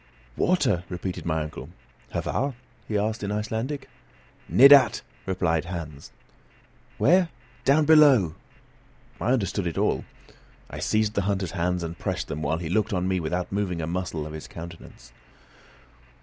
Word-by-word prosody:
"Water!" 135 Hz, -, +2 dB
repeated 90 Hz, 0 st, -5 dB
my 80 Hz, -1 st, 0 dB
uncle. 75 Hz, -, -8 dB, 0.4 s
"Hvar?" 135 Hz, -1 st, -2 dB, 0.3 s
he 105 Hz, -, 0 dB
asked, 110 Hz, +2 st, -1 dB
in 100 Hz, 0 st, -3 dB
Icelandic. 110 Hz, +7 st, -3 dB, 0.6 s
"Nedat," 135 Hz, -2 st, +7 dB, 0.2 s
replied 90 Hz, -3 st, 0 dB
Hans. 80 Hz, -5 st, -7 dB, 0.9 s
"Where? 180 Hz, +3 st, +4 dB, 0.4 s
Down 150 Hz, +3 st, +4 dB
below!" 140 Hz, -, +6 dB, 0.9 s
I 120 Hz, -, 0 dB
understood 100 Hz, -5 st, -1 dB
it 85 Hz, -, -4 dB
all. -, -, +1 dB, 0.7 s
I -, -, -6 dB
seized 110 Hz, -1 st, +1 dB
the 100 Hz, -, +1 dB
hunter's 95 Hz, -3 st, -1 dB
hands, 90 Hz, -1 st, -1 dB
and 85 Hz, +1 st, -6 dB
pressed -, -, -3 dB
them 75 Hz, -, -4 dB
while 80 Hz, +2 st, 0 dB
he 85 Hz, -1 st, -5 dB
looked 105 Hz, +5 st, 0 dB
on 90 Hz, 0 st, 0 dB
me 95 Hz, -1 st, +1 dB
without 90 Hz, +2 st, -3 dB
moving 95 Hz, -4 st, -1 dB
a 80 Hz, -, -2 dB
muscle 85 Hz, -2 st, -3 dB
of 75 Hz, -, -8 dB
his 80 Hz, -, -7 dB
countenance. 85 Hz, -7 st, -11 dB
95 Hz, 145 wpm, -25 LUFS, 85-110 Hz, 0.9 s, Nedat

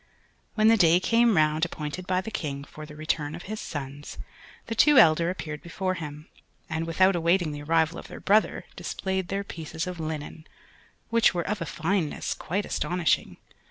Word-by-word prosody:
When 215 Hz, 0 st, +4 dB
the 225 Hz, 0 st, +6 dB
day 170 Hz, -2 st, +5 dB
came 230 Hz, 0 st, +3 dB
round 155 Hz, 0 st, +3 dB
appointed 170 Hz, +1 st, -4 dB
by 185 Hz, 0 st, +1 dB
the 220 Hz, -, -7 dB
King 145 Hz, -9 st, -4 dB
for 155 Hz, +1 st, -10 dB
the 150 Hz, -, -11 dB
return 155 Hz, 0 st, -2 dB
of 175 Hz, -, -9 dB
his 215 Hz, +2 st, -5 dB
sons, 145 Hz, 0 st, -7 dB, 0.5 s
the 230 Hz, -, -4 dB
two 295 Hz, +5 st, +5 dB
elder 165 Hz, -1 st, +6 dB
appeared 155 Hz, -5 st, -5 dB
before 185 Hz, +2 st, -2 dB
him, 150 Hz, -3 st, -7 dB, 0.4 s
and, 160 Hz, 0 st, -3 dB
without 185 Hz, +3 st, +3 dB
awaiting 170 Hz, -1 st, +2 dB
the 145 Hz, 0 st, -6 dB
arrival 165 Hz, +2 st, +1 dB
of -, -, -10 dB
their -, -, -9 dB
brother, 215 Hz, +2 st, +2 dB
displayed 190 Hz, -2 st, -3 dB
their 195 Hz, +2 st, -2 dB
pieces 160 Hz, -3 st, -5 dB
of 180 Hz, -2 st, -6 dB
linen, 155 Hz, 0 st, -5 dB, 0.6 s
which 230 Hz, -5 st, +4 dB
were 170 Hz, -, -1 dB
of 210 Hz, 0 st, -2 dB
a 165 Hz, -, -3 dB
fineness 165 Hz, 0 st, -1 dB
quite 200 Hz, +5 st, -3 dB
astonishing. 175 Hz, -2 st, 0 dB
170 Hz, 180 wpm, -27 LUFS, 155-190 Hz, 0.6 s, the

